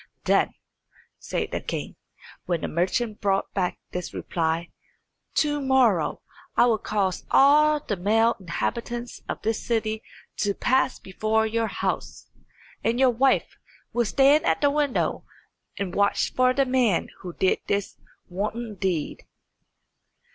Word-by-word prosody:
"Then," - - +2 0.6
said - - -3
the - - -2
king, - - -5 0.5
when 170 -3 0
the - - -2
merchant 210 +6 -1
brought 195 -1 0
back 185 -3 -1
this 180 0 -5
reply, 165 0 -2 0.6
"to 295 -1 +1
morrow 255 - +2 0.3
I - - +6
will 225 -3 +2
cause 195 -4 -1
all 300 +2 +5
the 220 -8 -3
male 220 +5 +2
inhabitants 235 +6 -4
of - - -4
this 225 0 -1
city 220 -2 -1 0.4
to 205 -2 0
pass 260 +1 +1
before 215 +3 0
your 225 +1 0
house, - - -4 0.5
and 230 +2 +1
your 260 -1 +5
wife 260 +3 +2 0.4
will 240 -1 +2
stand 275 +6 +4
at - - +1
the 285 -1 +4
window 290 -3 0 0.5
and 195 -3 -3
watch 200 0 +1
for 255 0 +4
the 275 +1 +2
man 250 -8 +1
who 180 -2 -7
did 190 - +1
this 200 -1 -1 0.3
wanton 215 +5 -4
deed." 180 -7 -2
220 Hz, 135 wpm, -25 LUFS, 195-255 Hz, 0.6 s, I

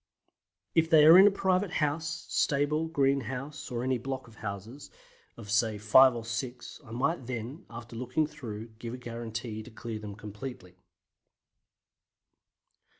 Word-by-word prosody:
If 165 -1 +3
they 155 -3 +7
are 160 +2 +10
in 190 +2 +9
a - - +8
private 190 -1 0
house, 155 +1 -1
stable, 150 +3 +1
greenhouse, 140 -1 -1
or 120 -1 -3
any 130 -1 0
block 130 +1 -5
of 115 - -15
houses, 110 +6 -7 0.5
of 105 -4 -8
say 110 -1 +2
five 120 +5 +6
or 115 -1 -5
six, 120 +5 -5
I 125 - -16
might 130 +3 -1
then, 125 +5 -6
after 115 0 -9
looking 125 +6 0
through, 115 -6 -8
give 115 +1 -5
a - - -8
guarantee 115 -2 -6
to 110 - -11
clear 110 0 -6
them 105 -2 -7
completely. 105 -2 -8
125 Hz, 150 wpm, -29 LUFS, 115-145 Hz, 0.5 s, are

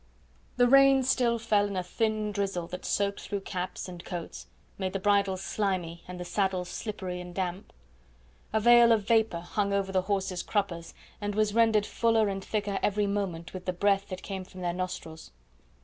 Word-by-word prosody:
The 245 - +5
rain 275 +1 +6
still 245 -2 +2
fell 210 -3 +2
in 200 - -5
a 185 - 0
thin 215 +3 -1
drizzle 195 -4 -2
that 180 +1 -7
soaked 200 0 0
through 200 -2 -4
caps 185 -1 -4
and 175 -2 -9
coats, 175 -2 -6 0.3
made 185 -1 -2
the 195 - -1
bridles 195 -1 +2
slimy 185 -6 -2
and 180 0 -7
the 180 - -5
saddles 185 -2 -1
slippery 185 -5 -5
and 175 0 -10
damp. 185 0 -3 0.8
A 220 - +2
veil 240 +1 +7
of 210 -2 0
vapour 220 -7 +2
hung 200 +3 -1
over 195 -1 0
the 190 -1 +2
horses' 190 -2 -1
cruppers, 175 -5 -2 0.3
and 205 0 -2
was 215 -1 +2
rendered 225 -2 +4
fuller 225 -2 +2
and 195 -1 -4
thicker 205 -2 -2
every 210 0 +1
moment 195 -5 -3
with 185 -1 -7
the 185 - -1
breath 200 +2 +2
that 185 -1 -7
came 190 -2 -5
from 185 0 -12
their 175 -1 -1
nostrils. 175 -3 -5
200 Hz, 185 wpm, -29 LUFS, 180-210 Hz, 0.8 s, veil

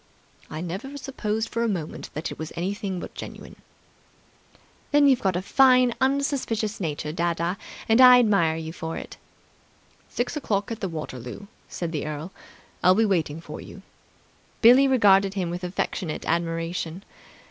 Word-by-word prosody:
"I 155 - -5
never 195 +12 -5
supposed 225 -5 -3
for 230 - -2
a 235 - +2
moment 175 -8 -4
that 155 +3 -4
it - - -9
was 160 0 -5
anything 195 +1 -3
but - - -8
genuine." - - -9 1.3
"Then 290 -1 +5
you've 265 -3 +4
got 190 -3 +1
a 180 - -2
fine, 255 +1 +5
unsuspicious 265 -6 0
nature, 150 -3 -3
dadda, 170 +1 -1 0.3
and 225 +3 +5
I 250 -1 +10
admire 200 -9 +3
you 160 0 -6
for 165 -2 -5
it." - - -8 0.9
"Six 245 +5 -2
o'clock 210 -8 -1
at 225 -2 -6
Waterloo," 150 - -5 0.3
said 170 -2 -4
the 155 -2 -3
earl. 155 +4 -5 0.5
"I - - +6
will 185 - +6
be 225 +2 +3
waiting 165 -6 0
for - - -8
you." - - -12 0.8
Billie 255 +4 +8
regarded 200 -6 +4
him 180 -3 -2
with 175 +1 -5
affectionate 175 -2 -3
admiration. 165 +1 -2
190 Hz, 155 wpm, -25 LUFS, 165-235 Hz, 1.3 s, I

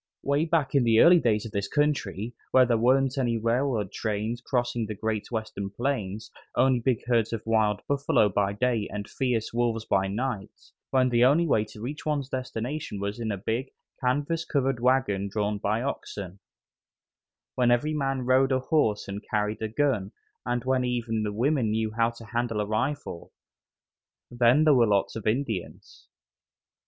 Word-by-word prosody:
'Way 140 +3 +1
back 160 -5 0
in 140 -3 +4
the 115 -1 +4
early 175 +5 +7
days 110 -6 +1
of 115 - -7
this 100 -1 -2
country, 120 -6 -1 0.2
when 130 -1 +5
there 120 - +2
weren't 130 +3 +2
any 120 -3 +1
railroad 115 -3 0
trains 110 +3 -3
crossing 120 -3 -1
the 105 - -5
great 110 0 -3
Western 110 -4 -4
plains, 110 -3 -3 0.3
only 130 0 +4
big 120 -1 -1
herds 120 -3 +1
of 110 - -4
wild 110 -2 +1
buffalo 140 -6 +2
by 100 0 0
day 115 -1 0
and 105 -1 -5
fierce 120 -5 -2
wolves 115 -2 0
by 95 -2 +1
night; 110 0 -5 0.2
when 130 -1 +3
the 120 0 +3
only 145 +7 +4
way 110 -9 +2
to 105 0 -13
reach 140 +6 -5
one's 145 -3 -1
destination 130 -2 -4
was 100 +3 -4
in 115 -2 -2
a 100 - -2
big, 115 +7 -2 0.3
canvas 145 +6 0
covered 135 -5 0
wagon 120 -6 +1
drawn 105 0 -1
by 110 +4 0
oxen; 100 -8 -5 1.1
when 125 -1 +2
every 120 +6 +2
man 135 -3 -1
rode 130 +2 +3
a 130 - +3
horse 130 -7 +1
and 100 +1 -6
carried 105 -1 -1
a 110 - -1
gun, 110 -5 0 0.4
and 120 0 -1
when 130 -1 +1
even 120 -3 -1
the 105 -1 -2
women 125 +2 +1
knew 110 0 -1
how 115 +1 +2
to 115 -1 -12
handle 120 -1 -2
a 105 - 0
rifle 110 -3 -3 1.0
then 120 +4 +4
there 155 -1 +6
were 120 -3 +4
lots 100 -2 +1
of 110 -2 -5
Indians. 110 -5 -3
120 Hz, 175 wpm, -27 LUFS, 105-130 Hz, 1.1 s, early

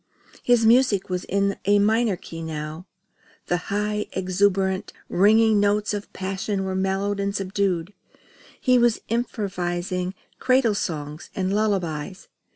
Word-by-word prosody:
His 240 -2 +3
music 225 -5 +4
was 180 0 -2
in 200 0 0
a 205 +1 +4
minor 215 +1 +2
key 165 -1 -9
now. 155 +2 -6 0.6
The 175 - 0
high, 210 +1 -1
exultant, 190 +1 0 0.2
ringing 215 +3 +4
notes 205 +1 +1
of 205 0 -5
passion 195 +1 -3
were 190 0 -2
mellowed 195 +2 -1
and 200 0 -1
subdued. 195 -2 -1 0.7
He 255 -1 +4
was 240 -2 +2
improvising 185 -5 -2 0.2
cradle 255 -4 +3
songs 150 -5 -4
and 190 0 -1
lullabies. 190 -5 -2
195 Hz, 125 wpm, -24 LUFS, 185-210 Hz, 0.7 s, music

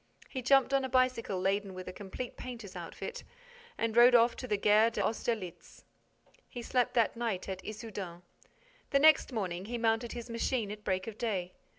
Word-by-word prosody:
He 260 - -4
jumped 270 +1 +4
on 270 -1 +3
a 260 - -2
bicycle 255 -6 +1
laden 195 +1 0
with 185 0 -8
a 185 - -6
complete 205 +6 -7
painter's 230 -6 -8
outfit 180 - -7 0.5
and 230 -1 -1
rode 240 +1 +8
off 235 0 +5
to 255 - -6
the 210 -3 +1
Gare 210 +3 +5
d'Austerlitz. 220 -4 -3 0.6
He 240 - -7
slept 250 0 0
that 230 -3 +3
night 230 -6 -2
at 190 -1 -5
Issoudun. 205 -5 -7 0.7
The 280 - +3
next 310 -1 +6
morning, 190 -5 -3
he 240 +3 -3
mounted 225 0 0
his 240 -1 -6
machine 230 -2 -1
at 210 0 -8
break 185 -1 -1
of 225 -1 -8
day. 190 -7 -2
225 Hz, 180 wpm, -31 LUFS, 195-245 Hz, 0.7 s, rode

